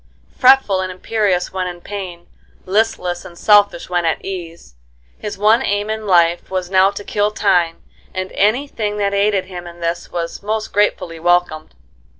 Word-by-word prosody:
Fretful 255 -7 +5
and 185 0 -3
imperious 185 -1 -1
when 185 -1 -2
in 175 -1 -7
pain, 180 -3 -7 0.4
listless 185 -3 0
and 170 - -12
selfish 205 -3 +4
when 175 -1 0
at 165 -1 -1
ease, 170 - -7 0.5
his 210 - -5
one 215 +4 +4
aim 205 -2 -1
in 220 -1 -4
life 175 -2 +3
now 185 0 +2
was 200 - -3
to 205 - -6
kill 205 +1 0
time, 180 -6 +1 0.3
and 185 0 -4
any 225 +8 +1
thing 210 -5 -3
that 200 -1 0
aided 200 -1 +1
him 180 -2 -8
in 170 0 -11
this 170 0 -3
was 170 -1 -4
most 215 +1 -3
gratefully 180 -5 0
welcomed. 175 - 0
190 Hz, 165 wpm, -18 LUFS, 175-210 Hz, 0.5 s, Fretful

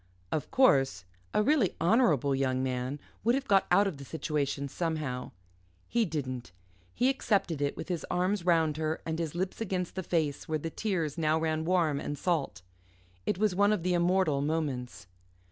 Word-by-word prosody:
Of 155 - -2
course, 135 - +3 0.3
a 210 - +2
really 270 - +2
honourable 165 - +3
young 130 -1 0
man 130 +2 -2 0.2
would 235 +3 +3
have 275 0 -3
got 195 -2 +4
out 200 - +5
of 190 -7 -2
the 140 - -9
situation 140 -2 -2
somehow. 150 -5 -3 0.6
He 235 0 +2
didn't. 130 - -4 0.4
He 250 - +1
accepted 200 - +1
it, 140 0 -1
with - - -6
his 175 -3 -2
arms 185 +1 0
round 165 -3 +2
her 155 0 -1
and 160 0 -2
his 165 -1 -3
lips 185 +4 -3
against 185 -4 -2
the 190 - -3
face 160 -5 -1
where 155 - +1
the 165 +2 -5
tears 170 -6 -2
now 155 0 +2
ran 160 0 -1
warm 165 -5 +2
and 145 0 -4
salt. 160 - -1 0.6
It - - +1
was 210 -1 +2
one 205 +3 +3
of 205 -6 0
the 180 0 +1
immortal 175 -4 +2
moments. 130 - -2
160 Hz, 180 wpm, -30 LUFS, 140-185 Hz, 0.6 s, out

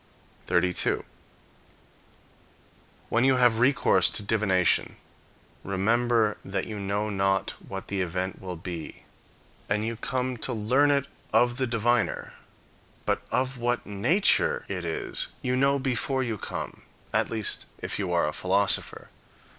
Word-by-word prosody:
32. 90 0 +1 2.0
When 120 - +2
you 135 0 +5
have 120 -3 +4
recourse 125 -8 +4
to 105 +1 -3
divination, 100 -4 +1 0.7
remember 110 +3 +1
that 95 0 -3
you 105 -2 -6
know 100 +2 -2
not 95 0 +1 0.2
what 95 -1 -6
the 100 -1 -2
event 90 +1 -3
will 90 -1 -5
be, 85 -1 -7 0.7
and 105 +1 +1
you 115 +1 -2
come 125 +2 -2
to 125 - -2
learn 125 +7 +3
it 140 -1 +2 0.3
of 120 0 +3
the 130 - 0
diviner; 120 +1 0 0.7
but - - 0
of 130 0 -1
what 120 0 0
nature 200 - +2
it - - -4
is 385 -3 +1 0.2
you 125 -1 +1
know 140 +2 +3
before 130 0 0
you 115 -3 -2
come, - - -6 0.3
at - - +1
least 110 -2 -1
if - - -4
you 95 -3 -2
are 85 -3 +2
a 75 - -2
philosopher. 95 +2 +1
110 Hz, 135 wpm, -27 LUFS, 95-130 Hz, 2.0 s, you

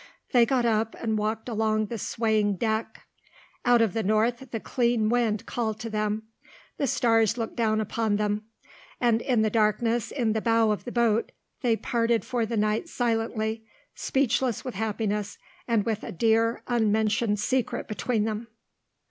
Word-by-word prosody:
They 240 -3 +5
got 255 -3 +1
up 220 -1 +1
and 220 -2 -1
walked 215 +2 -2
along 215 -2 +1
the 225 +1 -5
swaying 215 -2 +1
deck. 220 +2 -2 0.6
Out 240 -2 +5
of 215 -5 0
the 225 - 0
north 225 +5 +1
the 225 - -3
clean 235 -2 +1
wind 230 -3 +1
called 220 -3 -2
to 230 -1 -5
them, 215 0 -1 0.5
the 280 - 0
stars 225 -2 +2
looked 225 -2 -4
down 220 -2 +1
upon 220 0 0
them, 210 0 -1 0.5
and 235 -2 +2
in 240 -4 +2
the 215 - +1
darkness 225 +1 +1
in 235 -6 0
the 220 - -1
bow 225 -1 +3
of 210 - -3
the 245 - -5
boat 235 -2 +1 0.3
they 235 -3 +2
parted 230 0 0
for 235 -3 -1
the 230 0 -2
night 215 - 0
silently, 225 -3 -1 0.3
speechless 260 -3 0
with 255 - -4
happiness 210 -1 -2 0.3
and 225 -4 +1
with 220 -2 -1
a - - -6
dear, 225 +4 +2
unmentioned 220 -1 +1
secret 255 +3 -1
between 215 +2 -1
them. 220 +1 -3
225 Hz, 165 wpm, -26 LUFS, 215-235 Hz, 0.6 s, They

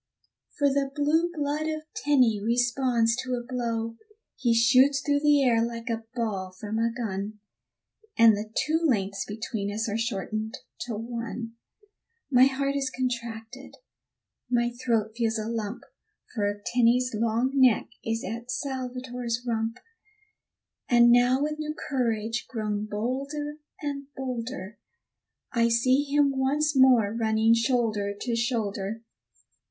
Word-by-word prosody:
For 285 - +3
the 275 0 +1
blue 315 +4 +2
blood 300 -1 -2
of 310 -1 -3
Tenny 250 -8 +3
responds 240 0 +2
to 255 0 -2
a 240 - -4
blow. 230 -2 -3 0.4
He 240 -3 +1
shoots 255 +4 +5
through 285 +1 +1
the 295 -1 +4
air 230 -3 +3
like 230 0 -4
a 225 0 -3
ball 195 -6 -3
from 215 +1 -3
a 230 0 +1
gun, 210 -3 -4 0.8
And 225 -2 +7
the 210 +1 -5 0.2
two 320 +2 +1
lengths 195 -9 0
between 210 -1 -4
us 220 +2 -2
are 220 +1 -2
shortened 215 -1 -3 0.3
to 230 - -3
one, 230 +1 -5 0.8
My 255 0 +7
heart 275 +1 0
is 275 -1 0
contracted, 240 0 -5 0.7
my 240 -1 +2
throat 230 -3 -1
feels 230 -1 0
a 215 - -3
lump, 225 -1 -4 0.5
For 205 -2 -2
Tenny's 245 +1 +2
long 230 +4 +1
neck 260 -5 +4
is 225 0 -2
at 235 +4 -6
Salvator's 250 -2 -3
rump; 225 0 -1 1.1
And 240 -1 +6
now 245 +3 +4
with 305 +1 -2
new 305 0 -3
courage 230 -5 -2
grown 215 -3 -2
bolder 275 +8 -3 0.3
and 280 -1 -4
bolder, 235 -5 -5 0.7
I 235 -1 +2
see 255 +4 +3
him, 285 0 +2
once 290 +3 +1
more 250 -6 +5
running 220 0 +3
shoulder 230 -4 +1
to 235 +1 -1
shoulder. 225 -2 -2
235 Hz, 135 wpm, -27 LUFS, 225-265 Hz, 1.1 s, And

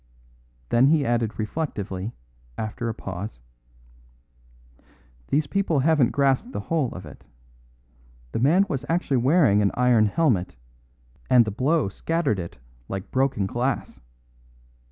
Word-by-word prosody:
Then 120 +3 +4
he 150 -1 +3
added 115 -3 0
reflectively, 110 -5 -3 0.5
after 110 +2 -3
a - - -2
pause: 100 - -6 1.9
"These 150 +2 +1
people 170 -4 0
haven't 150 -4 +3
grasped 140 - +1
the - - -3
whole 155 -8 -1
of 90 - -8
it. - - -14 1.0
The - - -2
man 165 +11 +4
was 135 -8 -3
actually 165 -5 +1
wearing 130 - +4
an 100 - +3
iron 120 -3 +4
helmet, 105 - +1 0.7
and 125 -3 +6
the 110 - -3
blow 135 +5 +1
scattered 160 - -1
it 85 -1 -7 0.3
like 95 -1 -5
broken 130 -6 +1
glass. 120 +7 -2
125 Hz, 125 wpm, -24 LUFS, 105-150 Hz, 1.9 s, and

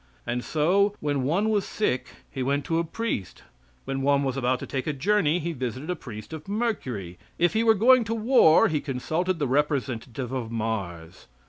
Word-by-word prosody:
And 120 +1 -2
so, 195 +7 +2
when 145 -2 -1
one 175 +11 +1
was 210 -2 +2
sick 160 -14 -1 0.2
he 135 - -4
went 140 +2 0
to 165 -1 0
a - - +1
priest; 165 - -4 0.4
when 135 0 -3
one 140 +1 +3
was 135 -2 -1
about 130 -1 +1
to - - -4
take 135 0 -4
a 155 - 0
journey 170 +2 +2
he 170 0 -3
visited 130 +3 -5
the 180 - 0
priest 115 -3 -9
of 155 +1 -8
Mercury; 135 - -3 0.2
if 175 0 +2
he 220 +1 +2
were 225 -1 +5
going 245 +4 +5
to 225 +1 -2
war 225 -8 +5
he 150 -3 -1
consulted 160 +7 -2
the 150 - -1
representative 130 -3 -1
of 125 -4 -3
Mars. 100 -8 -4
145 Hz, 195 wpm, -26 LUFS, 125-185 Hz, 0.4 s, were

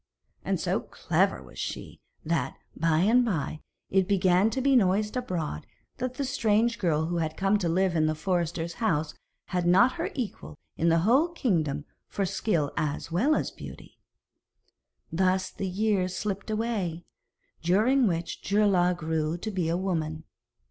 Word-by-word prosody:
And - - -1
so - - 0
clever - - 0
was - - -13
she, - - -6 0.2
that, 155 -5 -1 0.2
by 165 0 +2
and 235 +6 +4
by, 160 - -2 0.3
it 190 -1 +3
began 190 0 +3
to 265 - -2
be 270 +1 +3
noised 210 0 +2
abroad 175 - -3 0.3
that 255 0 -3
the 280 - -2
strange 230 -3 +1
girl 160 -4 +1
who 170 +1 -2
had 160 -1 -2
come 195 +2 +2
to 175 -4 0
live 185 +1 +1
in 155 -1 +3
the 155 - 0
forester's 170 0 -1
house 160 -9 0 0.4
had 180 -2 0
not 195 +9 +6
her 330 - -2
equal 230 - -5 0.2
in 170 - +2
the 165 - +4
whole 255 - +4
kingdom 160 - -1 0.2
for 200 - -2
skill 180 -5 0
as 150 +2 -2
well 250 - +3
as - - -1
beauty. - - -11 1.1
Thus 185 +2 +1
the 195 - -4
years 190 -2 0
slipped 205 0 -3
away, 215 -7 -2 0.6
during 220 +9 +3
which 170 -2 -2
Geirlaug 195 -4 +2
grew 160 -1 -1
to 215 +5 -5
be 180 -4 -1
a 170 - +1
woman. 160 -4 -2
185 Hz, 160 wpm, -27 LUFS, 165-215 Hz, 1.1 s, not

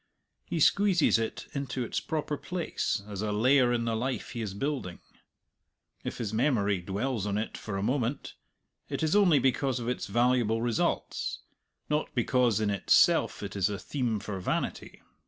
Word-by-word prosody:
He 170 - -2
squeezes 185 - +4
it 115 - -3
into 135 -2 -3
its 115 - -2
proper 150 -1 -2
place 170 - -2
as 100 -2 -5
a 105 -1 -1
layer 125 +4 +4
in 120 -1 0
the 115 -1 0
life 125 +3 -3
he 120 - -4
is 100 -3 -4
building. 130 -7 -3 1.0
If - - -4
his 110 -3 -3
memory 110 -6 +1
dwells 105 +4 -2
on 100 0 -1
it 110 - -3
for 100 -3 -5
a 95 - -2
moment, 130 +2 -1 0.6
it - - -2
is 160 +4 +2
only 190 -7 +5
because 130 0 +1
of 120 - -5
its 125 - -2
valuable 120 +1 +2
results, 115 -1 -1 0.5
not 150 +1 -1
because 120 -2 +2
in 105 -1 +1
itself 100 - +3
it - - -6
is 95 -1 +2
a 100 - -3
theme 115 +1 -2
for 100 -1 -5
vanity. 90 - -3
120 Hz, 170 wpm, -29 LUFS, 105-135 Hz, 1.0 s, only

